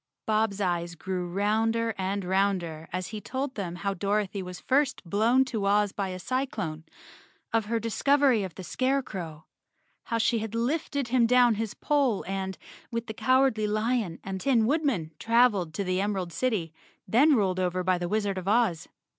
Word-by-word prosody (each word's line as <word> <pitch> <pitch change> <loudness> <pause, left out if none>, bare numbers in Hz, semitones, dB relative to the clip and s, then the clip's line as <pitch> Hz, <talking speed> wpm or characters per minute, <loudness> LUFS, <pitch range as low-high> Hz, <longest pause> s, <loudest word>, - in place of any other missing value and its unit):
Bob's 215 -2 +1
eyes 175 -3 -1
grew 180 +1 -3
rounder 220 +4 +1
and 195 0 -2
rounder 180 -4 0
as 185 0 -3
he 215 -1 -6
told 265 +3 -3
them 180 -6 -4
how 195 +3 -2
Dorothy 200 +1 -1
was 180 -1 -7
first 280 +1 +1
blown 230 +8 +3
to 225 -6 -3
Oz 205 0 +3
by 195 -1 -3
a 185 - -5
cyclone, 195 - -3 0.7
of 225 -2 +2
her 230 +2 0
discovery 255 +1 +2
of 185 -4 -6
the 190 - -8
Scarecrow, 190 - -2 0.6
how 230 - -1
she 230 +1 +2
had 220 0 -5
lifted 275 +1 -1
him 240 -2 +3
down 245 -1 +5
his 220 -1 -3
pole 275 -8 +1
and, 190 0 -3 0.3
with 230 -1 -3
the 220 - -6
Cowardly 255 -3 +2
Lion 215 -4 0
and 190 -1 -5
Tin 240 -5 +3
Woodman, 265 - 0
traveled 225 -7 +3
to 200 - -1
the 185 0 0
Emerald 190 -4 -2
City, 205 -11 -1 0.3
then 275 +9 +5
ruled 190 -5 +1
over 180 0 0
by 180 0 +1
the 175 0 -3
Wizard 205 -2 0
of 185 - -9
Oz. 205 -7 +2
210 Hz, 170 wpm, -27 LUFS, 185-235 Hz, 0.7 s, down